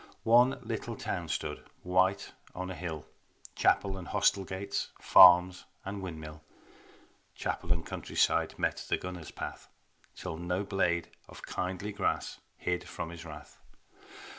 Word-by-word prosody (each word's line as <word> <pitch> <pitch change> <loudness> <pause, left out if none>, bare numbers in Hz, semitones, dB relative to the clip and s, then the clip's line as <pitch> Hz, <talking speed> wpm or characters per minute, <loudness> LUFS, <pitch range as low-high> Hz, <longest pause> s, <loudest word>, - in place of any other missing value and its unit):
One 120 +4 +5
little 115 -1 -4
town - - -3
stood, - - -3 0.2
white 95 +2 +2 0.2
on 90 +1 -4
a - - -3
hill, 85 -4 -5 0.5
Chapel 95 -1 +2
and 90 - -9
hostel 100 - +2
gates, 95 +1 -3
farms 90 0 +7 0.2
and 100 +1 -4
windmill, 80 -4 -7 0.9
Chapel 85 - -3
and 85 -2 +1
countryside - - 0
met - - -1
the - - +2
gunner's 90 -3 -7
path, - - -7 0.5
Till 80 - -5
no 90 +3 -1
blade 90 -4 0 0.2
of - - -12
kindly 95 +3 -3
grass 100 - -1 0.2
hid 90 0 -2
from 80 - -5
his 85 0 -9
wrath. 75 -2 -11
90 Hz, 135 wpm, -31 LUFS, 85-95 Hz, 0.9 s, farms